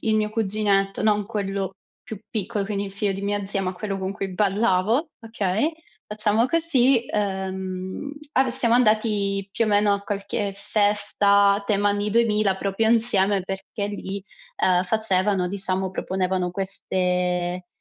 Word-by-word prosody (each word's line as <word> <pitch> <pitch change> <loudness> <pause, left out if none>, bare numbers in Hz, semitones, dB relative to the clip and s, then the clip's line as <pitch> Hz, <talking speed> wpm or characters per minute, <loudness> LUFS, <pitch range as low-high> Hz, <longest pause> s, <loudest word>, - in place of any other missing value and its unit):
il 220 -1 +1
mio 210 0 0
cuginetto, 200 -2 +1
non 210 -2 +2
quello 195 -2 -3 0.3
più 220 - -8
piccolo, 205 -1 -2
quindi 200 0 -2
il 195 - -6
figlio 200 0 -1
di 195 - -5
mia 205 0 -1
zia, 195 0 -2
ma 185 -1 -2
quello 195 +1 -4
con 190 +1 -3
cui 195 -1 -4
ballavo, 210 - +1
okay, 220 - -1 0.4
facciamo 215 +2 +1
così, 270 -7 +3
ehm, 190 +3 -3 0.2
a 265 -1 +3
siamo 240 -2 0
andati 215 -4 +2
più 225 +4 +1
o - - 0
meno 205 0 +3
a 200 - 0
qualche 200 0 -3
festa 200 -1 +3
a 200 - 0
tema 205 0 +1
anni 205 +1 -1
2000 210 -3 +2
proprio 195 +3 0
insieme 205 -4 +2
perché 195 +2 -5
lì, 200 -1 -5 0.3
ehm, 180 -1 +3
facevano 195 -2 +1
diciamo, 190 0 0
proponevano 185 -1 -1
queste 180 -1 -1
200 Hz, 150 wpm, -24 LUFS, 190-215 Hz, 0.4 s, così